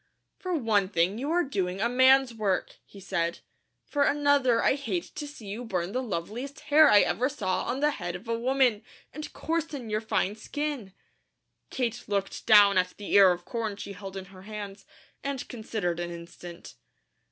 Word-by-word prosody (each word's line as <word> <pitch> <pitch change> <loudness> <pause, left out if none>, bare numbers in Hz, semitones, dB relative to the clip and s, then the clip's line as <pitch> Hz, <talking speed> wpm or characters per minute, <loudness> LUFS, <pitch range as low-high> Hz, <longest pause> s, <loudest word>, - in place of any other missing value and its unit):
"For 365 -1 -2
one 215 - +1
thing, 185 +3 +1
you 280 +4 -3
are 350 +2 +2
doing 190 - -2
a 225 - +2
man's 260 +1 +5
work," 205 -4 -1
he 200 - -13
said. 170 -3 -2 0.5
"For 290 - -2
another, 285 -5 +3
I - - +4
hate 290 +5 -3
to 295 -1 -5
see 285 -7 -11
you 205 +5 -5
burn 185 -5 -2
the 255 - -1
loveliest 240 - -5
hair 305 +1 +6
I 205 - +7
ever 255 +3 +1
saw 190 -10 -2
on 260 +3 -2
the 300 0 +3
head 175 -8 -5
of 190 +6 -9
a 230 - 0
woman, 250 -3 +2 0.3
and 305 +2 -7
coarsen 310 -8 -3
your 215 0 0
fine 210 -2 0
skin." 260 -3 -4 0.7
Kate 240 -2 -2
looked 200 -2 -3
down 205 -3 +7
at 180 0 -1
the 205 - -6
ear 195 -2 +8
of 175 0 -4
corn 225 -3 -3
she 200 0 -7
held 195 0 -8
in 190 - -6
her 185 - -12
hands, 200 -1 -8 0.4
and 275 -2 -4
considered 215 -7 -3
an 175 0 -3
instant. 170 0 -10
220 Hz, 185 wpm, -28 LUFS, 195-270 Hz, 0.7 s, ear